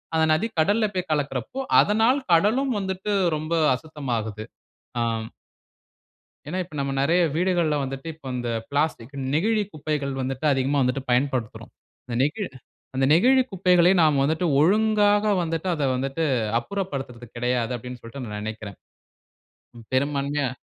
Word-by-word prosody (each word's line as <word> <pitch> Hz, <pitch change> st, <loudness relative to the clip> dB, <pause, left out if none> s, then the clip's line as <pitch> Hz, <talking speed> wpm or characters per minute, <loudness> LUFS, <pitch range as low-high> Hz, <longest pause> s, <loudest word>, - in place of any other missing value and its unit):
அந்த 160 Hz, -, +4 dB
நதி 180 Hz, +9 st, +1 dB
கடல்ல 210 Hz, +7 st, +3 dB
போய் 185 Hz, -2 st, -2 dB
கலக்குறப்போ, 140 Hz, -, -2 dB, 0.2 s
அதனால் 225 Hz, +6 st, +3 dB
கடலும் 230 Hz, +11 st, +3 dB
வந்துட்டு 190 Hz, +1 st, -3 dB, 0.2 s
ரொம்ப 155 Hz, +2 st, -4 dB, 0.2 s
அசுத்தமாகுது. 120 Hz, -8 st, -4 dB, 0.6 s
ஆம் 115 Hz, -1 st, -1 dB, 1.2 s
ஏனா, 180 Hz, +5 st, -3 dB
இப்ப 170 Hz, -3 st, -16 dB
நம்ம 140 Hz, 0 st, -1 dB
நெறய 165 Hz, +6 st, +3 dB
வீடுகள்ல 175 Hz, -3 st, +1 dB
வந்துட்டு, 135 Hz, +3 st, -5 dB
இப்ப 155 Hz, -2 st, -30 dB
அந்த 120 Hz, -1 st, -3 dB, 0.2 s
பிளாஸ்டிக் 140 Hz, -3 st, -1 dB, 0.2 s
நெகிழி 210 Hz, +6 st, +2 dB
குப்பைகள் 145 Hz, -2 st, -3 dB
வந்துட்டு 130 Hz, +2 st, -4 dB
அதிகமா 135 Hz, +2 st, +1 dB
வந்துட்டு 130 Hz, +1 st, 0 dB
பயன்படுத்துறோம். 125 Hz, -2 st, -1 dB, 0.4 s
அந்த 120 Hz, -, -5 dB
நெகிழ் 170 Hz, +8 st, -1 dB, 0.5 s
அந்த 135 Hz, -, +2 dB
நெகிழி 255 Hz, +10 st, +5 dB
குப்பைகளை 180 Hz, -1 st, +4 dB
நாம் 150 Hz, -3 st, +3 dB
வந்துட்டு 160 Hz, +5 st, +1 dB
ஒழுங்காக 205 Hz, +3 st, +3 dB, 0.2 s
வந்துட்டு 165 Hz, +2 st, -2 dB
அதை 150 Hz, -3 st, -2 dB
வந்துட்டு 135 Hz, +5 st, -2 dB, 0.3 s
அப்புறப்படுத்துறது 135 Hz, -9 st, -5 dB
கிடையாது 125 Hz, 0 st, 0 dB
அப்பிடினு 125 Hz, +1 st, -8 dB
சொல்லிட்டு 115 Hz, +4 st, -9 dB
நான் 105 Hz, -1 st, -5 dB
நினைக்கிறேன். 105 Hz, -2 st, -6 dB, 1.2 s
பெரும்பான்மையா 140 Hz, +1 st, 0 dB
150 Hz, 130 wpm, -24 LUFS, 130-180 Hz, 1.2 s, நெகிழி